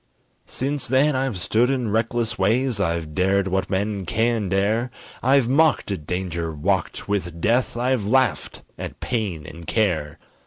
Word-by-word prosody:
Since 140 +1 -1
then 135 +3 +3
I've 130 -5 -1
stood 115 +7 +2
in 125 -5 -1
reckless 115 0 0
ways, 115 +4 +1
I've 85 -4 -1
dared 95 +3 +2
what 95 0 -1
men 100 -1 -2
can 115 -2 0
dare, 105 +6 +1 0.3
I've 135 -1 +4
mocked 145 -3 +3
at 80 -7 -5
danger, 85 -2 -2
walked 75 -1 -1
with 90 -5 -2
death, 120 +6 +1
I've 125 -2 +1
laughed 130 +5 +1 0.2
at - - -6
pain 100 -11 -2
and 85 +2 -10
care. 85 -10 0
105 Hz, 150 wpm, -23 LUFS, 95-125 Hz, 0.3 s, I've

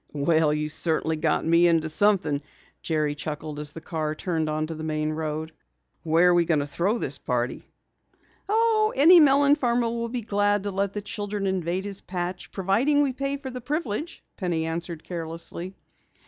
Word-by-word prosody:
"Well, 155 +1 +2
you 150 0 -1
certainly 160 +1 0
got 155 0 0
me 170 +1 +5
into 165 -2 +2
something," 165 -4 +2 0.4
Jerry 155 -2 0
chuckled 150 0 -6
as 150 -1 -3
the 165 - -9
car 155 -2 -3
turned 160 -2 -2
into 155 +1 -2
the 155 0 -7
main 155 -1 -1
road. 155 0 -4 0.5
"Where 165 +2 +4
are - - +5
we 175 -1 +4
going 160 -3 +2
to - - -2
throw 185 +10 0
this 145 - -2
party?" 120 0 -3 0.8
"Oh, 435 0 +3
any 335 +6 +8
melon 285 -1 +5
farmer 245 -5 +1
will 235 0 -3
be 245 0 -3
glad 205 -1 +1
to 205 - -3
let 195 0 -1
the 210 - -4
children 205 -2 -4
invade 185 0 -1
his 200 -1 -5
patch, 180 0 -4
providing 230 +10 +2
we 270 -2 0
pay 275 +2 -2
for 270 -2 -7
the 250 0 -7
privilege," 295 +2 -3
Penny 170 -4 -1
answered 165 0 -4
carelessly. 170 +2 -6
175 Hz, 175 wpm, -25 LUFS, 155-230 Hz, 0.8 s, any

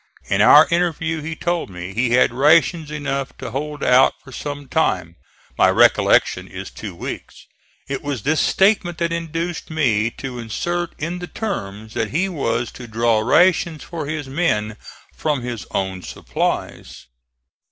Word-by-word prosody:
In - - +3
our - - +8
interview 165 -2 0
he 160 +2 -5
told 175 -3 -2
me 90 +1 -7
he 120 +4 +1
had 125 -1 +4
rations 155 +4 +3
enough 140 -3 -3
to 130 -3 -7
hold 150 +3 -4
out 130 +1 +5
for 135 - -13
some 145 +2 -6
time 90 - 0 0.4
my - - +6
recollection - - +4
is - - -8
two - - -8
weeks. - - -7 0.4
It 140 -1 -3
was 140 -7 -4
this 155 +2 +2
statement 190 -4 +2
that 170 -1 -1
induced 165 +1 -4
me 120 -9 +1
to 130 -3 -6
insert 170 +10 -3
in 170 +4 -4
the 175 - -6
terms 110 - -5
that 110 -2 -1
he 175 - 0
was 120 -9 -2
to 120 - -10
draw 115 0 +2
rations 165 +6 +3
for 160 -4 -6
his 155 -2 -4
men 120 -8 0 0.4
from 150 -5 -1
his 120 -3 -5
own 95 -1 -2
supplies. - - -4
145 Hz, 155 wpm, -20 LUFS, 115-165 Hz, 0.4 s, our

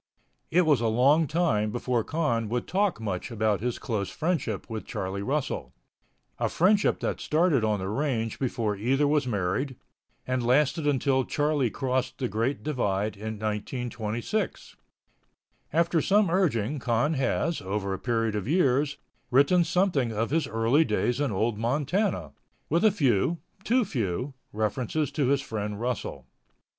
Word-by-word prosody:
It 180 +1 +3
was 145 -6 +3
a 115 - +1
long 140 +8 +4
time 130 -10 +1
before 120 +1 -1
Con 120 -9 -1
would 120 +1 -1
talk 195 - +1
much 100 -3 -3
about 110 -3 0
his 125 0 -1
close 105 -6 -2
friendship 155 - -2
with 110 -1 -6
Charlie 95 +1 -3
Russell—a 140 +7 -5
friendship 200 +4 +3
that - - -2
started 155 -5 +2
on 110 -1 +2
the 95 -1 -4
range 115 -1 -1
before 115 -5 -1
either 135 +8 +1
was 145 -2 +2
married, 115 +6 -1 0.5
and 130 -1 -1
lasted 145 +5 +2
until 135 -1 +2
Charlie 145 -2 +1
crossed 130 +1 -2
the 130 - -1
Big 115 +6 -1
Divide 105 -8 -1
in 110 +2 -5
1926. 115 - -3 1.0
After 170 +1 +2
some 200 -1 +3
urging 150 - +1
Con 120 +5 +1
has, 155 +4 0
over 100 +1 -2
a 95 - -4
period 115 -3 0
of 105 0 -3
years, 145 -3 +2 0.3
written 140 +8 +4
something 170 -10 +1
of 110 +3 -2
his 165 +1 +1
early 115 +7 +3
days 125 -3 0
in 145 - 0
Old 105 +2 0
Montana, 140 - 0 0.4
with 170 +3 +2
a 215 - +7
few, 150 - +1 0.3
too 245 +2 +2
few, 125 - -2 0.2
references 120 +7 -1
to 145 -4 0
his 140 +1 +2
friend 105 -3 -4
Russell. 125 +1 -3
125 Hz, 150 wpm, -27 LUFS, 110-150 Hz, 1.0 s, a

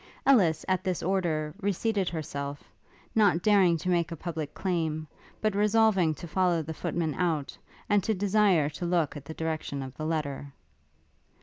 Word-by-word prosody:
Ellis, 185 - +4
at 185 -1 +1
this 185 -3 -2
order, 165 -5 0
re 200 +1 +1
seated 200 -1 0
herself, 140 -3 -6 0.4
not 200 -6 +3
daring 195 -5 +4
to 170 +4 -4
make 170 -2 +1
a - - -3
public 160 -2 -5
claim, 160 -4 -1 0.3
but 215 -1 +1
resolving 205 -5 +3
to 175 - -8
follow 175 -1 +1
the 160 +2 -5
footman 160 0 -2
out, 160 -5 -1 0.3
and 205 -2 +3
to 220 - +1
desire 195 -5 +3
to 155 +4 -6
look 170 -3 +1
at 145 -1 -8
the 160 - -8
direction 155 -4 -3
of 130 0 -9
the 155 - -4
letter. 145 -3 -3
170 Hz, 170 wpm, -28 LUFS, 155-190 Hz, 0.4 s, Ellis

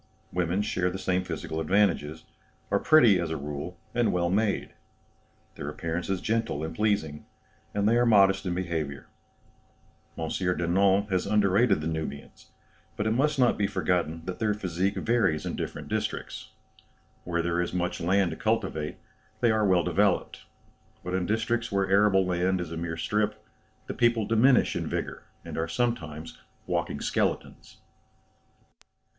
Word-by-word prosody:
Women 90 +3 0
share 90 -3 0
the 90 - -5
same 90 -1 0
physical 80 -3 -5
advantages, 80 -3 +1 0.5
are 100 - +3
pretty 120 - +6
as 85 -2 -2
a 80 - -2
rule, 75 +5 -6 0.2
and 120 -1 +2
well 85 -1 0
made; 105 +1 0 0.8
their 70 - -6
appearance 85 +3 -4
is 95 -2 -1
gentle 110 -9 -1
and 80 +1 -4
pleasing, 100 -8 -1 0.4
and 100 0 0
they 115 - +4
are 120 - +3
modest 95 -3 +4
in 90 - -1
behaviour. 80 -6 -3 1.1
M. 80 - -3
Denon 95 +2 +2
has 90 -1 0
underrated 105 -2 +3
the 75 - -3
Nubians, 80 -3 -6 0.5
but 105 - -1
it 110 - +1
must 145 +5 +1
not 125 -4 +3
be 100 - +2
forgotten 90 -4 -1
that 90 - -5
their 110 -2 +1
physique 95 -1 -1
varies 110 -10 +1
in - - -3
different - - -5
districts. - - -4 0.7
Where 85 -1 -1
there 85 0 0
is 85 - -2
much 90 -1 -2
land 95 +1 +2
to 80 - -6
cultivate, 95 -9 -1 0.4
they 120 - +3
are 110 -1 +2
well 90 -2 +3
developed; - - 0 0.6
but 90 - -4
in 90 -1 0
districts 115 +2 -1
where 100 -1 +1
arable 95 -1 +4
land 90 +1 +1
is 85 -2 -5
a - - -4
mere 80 0 -4
strip, 105 +4 -1 0.5
the - - -5
people 120 -3 +2
diminish 120 +4 +4
in - - -2
vigour, - - -4 0.2
and - - -5
are 80 - -1
sometimes 80 -7 -3 0.3
walking - - -2
skeletons." - - -2
95 Hz, 155 wpm, -27 LUFS, 85-105 Hz, 1.1 s, pretty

